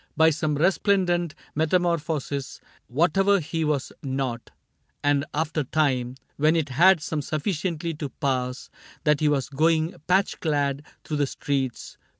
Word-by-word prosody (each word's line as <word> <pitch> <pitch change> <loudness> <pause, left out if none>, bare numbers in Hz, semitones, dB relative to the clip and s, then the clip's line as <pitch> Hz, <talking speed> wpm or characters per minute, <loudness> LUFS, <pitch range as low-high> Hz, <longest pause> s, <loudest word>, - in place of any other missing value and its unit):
By 160 0 +6
some 150 0 -1
resplendent 175 0 +2 0.2
metamorphosis. 160 -4 -1 0.3
Whatever 180 - +3
he 160 0 -3
was 150 -3 -1
not. 130 -3 -3 0.5
And 145 0 +2
after 155 0 -1
time. 130 -4 0 0.2
When 155 +3 +3
it 160 -3 0
had 165 +4 +5
come 155 -2 -1
sufficiently 165 +2 -2
to 150 -2 -5
pass 130 -2 -2 0.3
That 150 -1 +3
he 155 - +3
was 140 -3 0
going 160 +3 +2
patch 190 +2 +2
clad 145 -3 0 0.2
through 150 - -3
the 145 -1 +1
streets. 135 -3 -3
150 Hz, 135 wpm, -25 LUFS, 140-165 Hz, 0.5 s, By